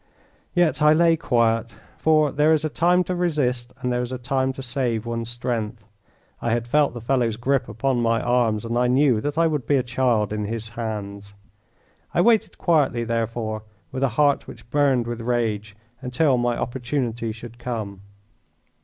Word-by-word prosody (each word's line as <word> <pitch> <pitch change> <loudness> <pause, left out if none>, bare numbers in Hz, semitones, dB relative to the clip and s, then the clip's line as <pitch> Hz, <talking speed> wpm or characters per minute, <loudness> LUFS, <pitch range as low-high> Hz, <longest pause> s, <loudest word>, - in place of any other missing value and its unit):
Yet 165 -5 +2
I 150 0 +6
lay 165 +1 +4
quiet, 115 -6 +1 0.2
for 155 -2 +3
there 150 +2 +3
is 155 0 +1
a - - 0
time 175 +4 +3
to 185 - -3
resist 140 -9 -1
and 125 -1 -1
there 125 - 0
is 125 0 -4
a 130 - -3
time 130 +1 0
to 135 - -7
save 120 -3 -1
one's 115 -1 -3
strength. 115 -2 -3 0.6
I 115 - -1
had 120 0 -1
felt 145 +1 +2
the 120 - -6
fellow's 120 -2 0
grip 130 +1 0
upon 120 +3 0
my 115 -1 +2
arms, 115 -3 +1
and 115 +1 -1
I 125 - +3
knew 130 -3 +3
that 145 +3 -3
I 165 - +4
would 150 -7 -1
be 145 - +3
a 130 - +2
child 120 -4 +1
in 105 -1 -2
his 115 +1 -4
hands. 100 -3 -6 0.8
I 175 - +4
waited 225 +1 +3
quietly, 145 -8 +2
therefore, 115 -1 -2 0.3
with 130 - -4
a 135 - +3
heart 145 -2 +3
which 120 - -13
burned 140 -5 +2
with 120 0 -4
rage, 110 -3 -1 0.3
until 130 +2 +2
my 120 -1 0
opportunity 120 -2 -2
should 115 +2 -10
come. 110 -6 -5
120 Hz, 180 wpm, -23 LUFS, 115-140 Hz, 0.8 s, I